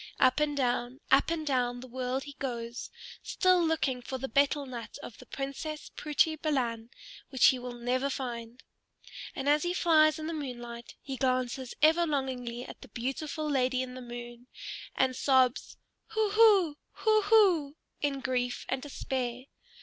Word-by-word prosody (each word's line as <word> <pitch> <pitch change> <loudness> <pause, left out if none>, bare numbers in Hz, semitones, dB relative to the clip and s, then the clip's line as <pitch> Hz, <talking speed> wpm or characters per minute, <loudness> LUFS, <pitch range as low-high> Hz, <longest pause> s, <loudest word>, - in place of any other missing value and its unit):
Up 255 +2 +4
and 295 -1 0
down, 245 0 0
up 270 +3 +5
and 330 -2 -2
down 245 -3 0
the 255 - -9
world 255 +1 -2
he 285 - -9
goes, 235 -2 -4 0.3
still 365 -2 +3
looking 310 -6 0
for 260 +2 -5
the 270 +1 -4
betel 280 +3 +2
nut 245 -3 -7
of 225 - -9
the - - -13
Princess 280 +3 -5
Putri 305 +1 +1
Balan, 240 -7 -1 0.4
which 265 - +3
he 260 - 0
will 245 0 -6
never 250 +3 0
find. 240 -3 -5 0.7
And 270 - -4
as 295 +1 +4
he 350 +2 -1
flies 310 -3 +4
in 310 - -5
the 330 - -3
moonlight 240 -5 -6
he 270 -1 -5
glances 255 -1 -1
ever 330 +2 +5
longingly 255 -4 -2
at - - -11
the - - -11
beautiful 290 +5 -3
lady 260 -2 +1
in 250 -1 -7
the 255 - -8
moon, 240 0 -9 0.5
and 260 -1 +2
sobs 260 -1 +2 0.4
"Hoo 435 -2 +1
hoo! 405 -8 +5 0.2
Hoo 435 -1 +3
hoo!" 370 -10 +4 0.3
in 280 -2 -1
grief 245 -1 -1
and 260 0 -1
despair. 255 -3 -3
265 Hz, 165 wpm, -30 LUFS, 245-305 Hz, 0.7 s, up